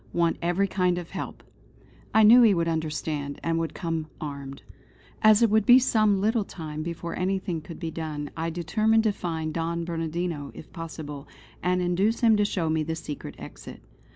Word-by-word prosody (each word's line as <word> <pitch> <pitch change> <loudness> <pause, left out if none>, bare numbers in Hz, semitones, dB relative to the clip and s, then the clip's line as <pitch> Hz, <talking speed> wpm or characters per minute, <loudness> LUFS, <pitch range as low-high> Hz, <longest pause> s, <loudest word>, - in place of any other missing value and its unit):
Want 170 -1 +1
every 175 +3 +1
kind 180 -2 +1
of 175 -1 -6
help." - - -6 0.7
I 220 - +5
knew 235 +4 +9
he 220 -5 +6
would 170 -1 0
understand, 155 -3 -2
and 165 0 0
would 165 -1 -3
come 165 -3 -3
armed. 140 -2 -7 0.6
As 215 +1 +6
it 225 - +4
would 220 0 +4
be 245 +3 +8
some 215 -6 +3
little 220 +2 +1
time 155 -5 -7
before 170 +1 -5
anything 185 -3 -1
could 165 +2 -10
be 165 -2 -4
done, 150 -3 -5
I 165 0 -2
determined 215 +7 +2
to 220 - +3
find 160 -5 -4
Don 170 +1 -2
Bernardino 165 -2 -3
if - - -12
possible; 155 -4 -7 0.3
and 180 0 +1
induce 190 +7 +1
him 225 -2 +5
to 205 - +3
show 180 -5 -1
me 160 0 +1
the 160 +1 -2
secret 150 -2 -7
exit. - - -10
170 Hz, 180 wpm, -26 LUFS, 160-200 Hz, 0.7 s, knew